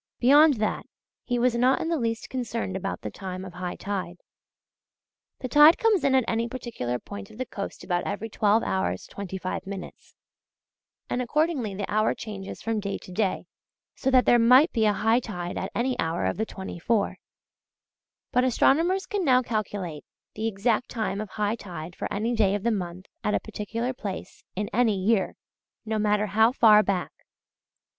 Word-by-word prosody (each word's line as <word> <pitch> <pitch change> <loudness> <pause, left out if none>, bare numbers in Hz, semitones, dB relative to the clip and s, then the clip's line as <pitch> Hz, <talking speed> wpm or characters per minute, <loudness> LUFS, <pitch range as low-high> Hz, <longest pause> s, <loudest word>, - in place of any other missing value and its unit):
Beyond 290 +4 +6
that 215 -1 -2 0.4
he 245 - 0
was 245 0 +2
not 250 +3 +3
in - - -2
the 330 -3 0
least 230 -1 -2
concerned 230 -6 -3
about 195 +1 -4
the - - -5
time 185 -1 -6
of 180 - -9
high 180 0 -4
tide. 190 -3 -4 1.2
The 255 - -3
tide 295 +6 +7
comes 440 -8 +2
in 275 -1 +3
at 260 - +4
any 230 +1 0
particular 230 - -4
point 200 +8 -9
of 215 - -14
the 255 - -3
coast 200 -4 -6
about 175 0 -1
every 205 +2 -3
12 215 +1 +2
hours 95 -1 -1
25 190 -1 -5
minutes, 195 -2 -9 0.9
and 250 - -1
accordingly 265 - 0
the 200 0 -3
hour 215 +1 +1
changes 200 -3 -7
from 225 -1 -1
day 200 -1 -3
to - - -13
day, 190 0 -1 0.5
so 265 - -1
that 255 -1 +5
there 240 - +5
might 255 +8 +6
be 225 -2 +1
a 210 - +4
high 225 +4 +2
tide 180 -7 -5
at - - -4
any 250 +2 0
hour 160 - -1
of 95 - -1
the 220 - -1
twenty 190 -2 -7
four: 215 +3 0 1.1
but 250 - +3
astronomers 330 - +3
can 405 -2 -2
now 255 -4 +4
calculate 205 -9 -3 0.3
the 220 +1 -2
exact 225 +3 0
time 215 -3 -2
of 215 - -6
high 210 +2 -1
tide 175 -5 -8
for - - -5
any 225 +4 -1
day 205 -4 +2
of 205 - -4
the 235 - +2
month 185 -3 -4 0.2
at 210 - +1
a - - +2
particular 225 +4 -4
place 200 -6 -7
in 205 +2 -2
any 225 -2 +3
year, 195 +1 +1 0.5
no 220 0 -1
matter 210 0 +2
how 220 +3 +4
far 215 -4 +6
back. 195 -4 -1
215 Hz, 180 wpm, -26 LUFS, 195-245 Hz, 1.2 s, tide